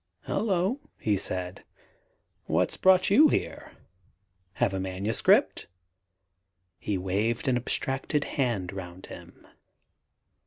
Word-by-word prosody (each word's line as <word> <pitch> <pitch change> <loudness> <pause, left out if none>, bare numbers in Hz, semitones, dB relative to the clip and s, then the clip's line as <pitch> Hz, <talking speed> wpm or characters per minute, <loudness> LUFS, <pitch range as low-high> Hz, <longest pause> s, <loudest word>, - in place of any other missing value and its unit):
"Hullo!" 195 +4 0 0.2
he 105 -2 +1
said, 95 -1 -4 0.8
"what's - - 0
brought 185 0 +4
you 300 +10 +7
here? - - -3 0.8
Have 95 - 0
a 95 - -2
manuscript?" 95 +3 +1 1.1
He 100 - -2
waved 105 +8 -1
an 130 - +3
abstracted 135 +4 -1
hand 110 -9 -2
round 90 -1 -8
him. - - -13
110 Hz, 95 wpm, -27 LUFS, 95-150 Hz, 1.1 s, you